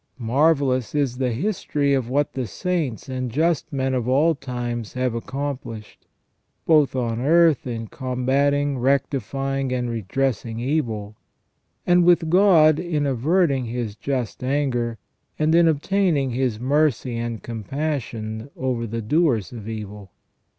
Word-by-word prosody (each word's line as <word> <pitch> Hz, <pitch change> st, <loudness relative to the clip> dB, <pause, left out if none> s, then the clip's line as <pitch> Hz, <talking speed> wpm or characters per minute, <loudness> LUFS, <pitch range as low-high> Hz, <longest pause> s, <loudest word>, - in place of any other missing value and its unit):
Marvellous 130 Hz, +1 st, +1 dB
is 135 Hz, -4 st, 0 dB
the 130 Hz, -2 st, +1 dB
history 145 Hz, -, 0 dB
of 130 Hz, -3 st, 0 dB
what 145 Hz, +2 st, 0 dB
the 130 Hz, -3 st, -3 dB
saints 160 Hz, -, -2 dB
and 130 Hz, -1 st, -3 dB
just 160 Hz, +4 st, 0 dB
men 135 Hz, -2 st, -1 dB
of 125 Hz, -2 st, -1 dB
all 145 Hz, +6 st, +3 dB
times 120 Hz, -5 st, -5 dB
have 125 Hz, -2 st, -1 dB
accomplished, 125 Hz, -3 st, -6 dB, 0.6 s
both 150 Hz, -5 st, +4 dB
on 120 Hz, -3 st, -1 dB
earth 160 Hz, -1 st, +4 dB
in 115 Hz, -2 st, -4 dB
combating, 135 Hz, +3 st, 0 dB
rectifying, 135 Hz, +1 st, 0 dB
and 125 Hz, -1 st, -1 dB
redressing 115 Hz, +1 st, -2 dB
evil; 115 Hz, -6 st, -2 dB, 0.7 s
and 175 Hz, 0 st, +4 dB
with 170 Hz, -2 st, +3 dB
God 170 Hz, -5 st, +5 dB
in 160 Hz, -5 st, -1 dB
averting 140 Hz, +1 st, +1 dB
His 115 Hz, -3 st, -4 dB
just 130 Hz, -1 st, -3 dB
anger, 125 Hz, -4 st, 0 dB, 0.4 s
and 155 Hz, +1 st, +2 dB
in 170 Hz, 0 st, +5 dB
obtaining 160 Hz, -3 st, +1 dB
His 120 Hz, -3 st, -1 dB
mercy 135 Hz, -2 st, +1 dB
and 115 Hz, -1 st, -4 dB
compassion 115 Hz, -1 st, -4 dB
over 125 Hz, -3 st, -2 dB
the 115 Hz, +1 st, -4 dB
doers 135 Hz, -, +1 dB
of 115 Hz, -3 st, -8 dB
evil. 105 Hz, -2 st, -7 dB
130 Hz, 130 wpm, -23 LUFS, 120-150 Hz, 0.7 s, God